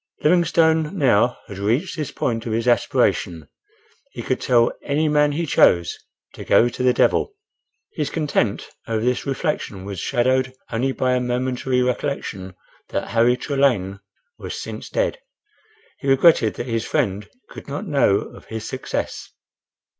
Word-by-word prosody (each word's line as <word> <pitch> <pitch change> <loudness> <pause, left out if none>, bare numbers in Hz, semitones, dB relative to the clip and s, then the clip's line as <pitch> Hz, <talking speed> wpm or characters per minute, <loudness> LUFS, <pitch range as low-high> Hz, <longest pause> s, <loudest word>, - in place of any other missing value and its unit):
Livingstone 160 0 +3
now 125 - +3
had 100 -1 -8
reached 120 - 0
this 150 -5 -3
point 115 0 -2
of 110 - -2
his 115 +2 -1
aspiration—he 345 - -2
could 130 - -2
tell 120 -2 +3
any 150 +2 0
man 150 -1 +3
he 165 +3 -1
chose 85 - +3 0.4
"to - - -9
go 120 - +4
to 120 - -5
the 125 0 +4
devil." 410 - +1 0.6
His 150 -3 -2
content 140 -9 -1 0.2
over 115 0 -1
this 125 +2 0
reflection 135 - -3
was 100 -3 -6
shadowed 130 +2 +1 0.2
only 125 +4 0
by 130 -1 0
a 125 - +2
momentary 125 +1 -1
recollection 110 -7 -3 0.3
that - - -3
Henry 120 +2 +3
Trelane 125 -10 0 0.4
was - - -6
since - - -7
dead. - - -1 0.8
He 140 - -6
regretted 135 -4 +4
that 120 - -5
his 115 -3 -2
friend 100 +2 -1 0.2
could - - -11
not 145 +9 -5
know 140 - +2
of - - -12
his 110 -1 -6
success. - - -4
125 Hz, 145 wpm, -21 LUFS, 115-150 Hz, 0.8 s, go